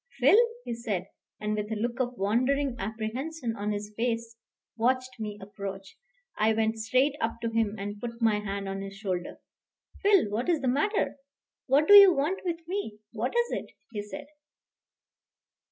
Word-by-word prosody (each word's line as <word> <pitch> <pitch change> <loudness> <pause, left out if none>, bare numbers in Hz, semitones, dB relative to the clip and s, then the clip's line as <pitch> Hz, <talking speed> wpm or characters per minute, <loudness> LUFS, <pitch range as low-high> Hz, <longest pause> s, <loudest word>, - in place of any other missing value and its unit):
"Phil," - - +6 0.3
he - - -3
said, 210 -6 -3 0.3
and 210 0 -1
with 210 +1 -3
a - - 0
look 235 +3 -2
of 250 -1 -1
wondering 255 +6 +1
apprehension 230 +6 -3
on 210 0 -2
his 210 0 -4
face, 230 0 -2 0.4
watched 255 +2 +1
my 210 -1 -4
approach. 195 -1 -7 0.4
I 220 +1 +4
went 220 0 0
straight 255 +6 +2
up 225 0 -1
to 230 - -1
him 225 -2 +1
and 205 +1 -5
put 235 -1 -5
my 220 -3 +3
hand 200 -1 -4
on 195 0 -4
his 195 0 -7
shoulder. 185 -4 -3 0.6
"Phil, 400 - +5
what 235 +9 -1
is 325 -5 +2
the 265 - -1
matter? 300 - +1 0.5
What 280 +3 +4
do 410 - +8
you 400 -2 +11
want 330 +5 0
with 335 -2 -4
me? 355 - -3
What 235 - -3
is 475 0 +2
it?" - - -4 0.2
he 210 -3 -3
said. 210 +8 -8
230 Hz, 170 wpm, -28 LUFS, 210-270 Hz, 0.6 s, you